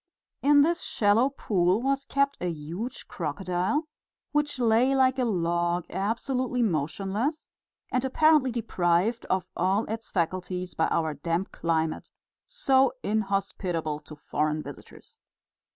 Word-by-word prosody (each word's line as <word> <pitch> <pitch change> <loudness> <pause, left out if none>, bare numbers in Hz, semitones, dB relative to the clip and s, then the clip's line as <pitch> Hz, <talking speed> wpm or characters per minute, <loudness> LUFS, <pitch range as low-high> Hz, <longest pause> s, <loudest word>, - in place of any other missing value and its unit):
In 285 0 +6
this 340 +3 +1
shallow 235 -4 +3
pool 190 -7 +1
was 275 +2 0
kept 280 0 +1
a 180 - 0
huge 170 - -6
crocodile, 180 - -1 0.5
which 295 -1 0
lay 245 +2 +3
like 260 0 +3
a 250 - +2
log 175 -3 0
absolutely 245 +5 -1
motionless 195 - -1 0.4
and 255 - +1
apparently 285 0 +4
deprived 205 -1 0
of 190 0 0
all 190 +5 +1
its 220 +1 -5
faculties 180 0 -2
by 160 - +1
our 160 -2 0
damp 170 +6 -2
climate, 160 -1 -1 0.4
so 270 - +3
inhospitable 195 -7 -1
to 150 0 -12
foreign 150 +1 -1
visitors. 455 - -12
200 Hz, 120 wpm, -27 LUFS, 175-260 Hz, 0.5 s, In